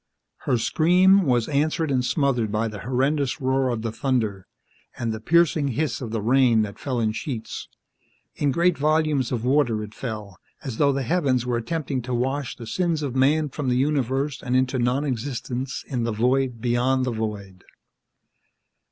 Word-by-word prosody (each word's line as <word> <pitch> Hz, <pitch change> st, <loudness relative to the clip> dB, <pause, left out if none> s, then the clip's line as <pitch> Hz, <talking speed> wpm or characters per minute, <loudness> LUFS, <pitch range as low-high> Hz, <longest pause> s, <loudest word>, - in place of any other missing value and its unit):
Her 125 Hz, -, +3 dB
scream 180 Hz, -, +4 dB
was 120 Hz, -3 st, +2 dB
answered 155 Hz, +2 st, 0 dB
and 130 Hz, -2 st, +1 dB
smothered 125 Hz, -4 st, 0 dB
by 110 Hz, +2 st, 0 dB
the 105 Hz, -2 st, -7 dB
horrendous 135 Hz, -, 0 dB
roar 130 Hz, -1 st, +1 dB
of 115 Hz, -2 st, -2 dB
the 115 Hz, -, -2 dB
thunder, 110 Hz, -5 st, -1 dB, 0.5 s
and 115 Hz, -2 st, -2 dB
the 110 Hz, -, -5 dB
piercing 165 Hz, +3 st, +3 dB
hiss 155 Hz, -2 st, -1 dB
of 120 Hz, -, -4 dB
the 110 Hz, -2 st, -3 dB
rain 120 Hz, -2 st, +4 dB
that 100 Hz, -1 st, -7 dB
fell 130 Hz, -4 st, -2 dB
in 110 Hz, -2 st, +1 dB
sheets. 115 Hz, +1 st, -5 dB, 0.7 s
In 145 Hz, -1 st, 0 dB
great 170 Hz, +4 st, +2 dB
volumes 155 Hz, -3 st, +1 dB
of 120 Hz, -2 st, -2 dB
water, 125 Hz, -5 st, +2 dB
it 105 Hz, 0 st, -9 dB
fell, 105 Hz, -7 st, -6 dB, 0.2 s
as 130 Hz, -5 st, -5 dB
though 145 Hz, -1 st, +4 dB
the 135 Hz, 0 st, -1 dB
heavens 135 Hz, -6 st, +1 dB
were 120 Hz, -1 st, 0 dB
attempting 135 Hz, +2 st, -3 dB
to 125 Hz, +1 st, -3 dB
wash 135 Hz, +2 st, -2 dB
the 115 Hz, -, -9 dB
sins 165 Hz, +4 st, -1 dB
of 135 Hz, -3 st, -3 dB
man 145 Hz, +3 st, +3 dB
from 140 Hz, -1 st, -3 dB
the 125 Hz, -, +2 dB
universe 135 Hz, 0 st, 0 dB
and 125 Hz, 0 st, -1 dB
into 130 Hz, 0 st, +1 dB
non 125 Hz, +4 st, +1 dB
existence 125 Hz, 0 st, -4 dB
in 125 Hz, -4 st, -2 dB
the 115 Hz, -, -1 dB
void 125 Hz, +2 st, +1 dB
beyond 125 Hz, +2 st, +1 dB
the 125 Hz, -, -1 dB
void. 105 Hz, -4 st, -5 dB
130 Hz, 180 wpm, -24 LUFS, 115-145 Hz, 0.7 s, scream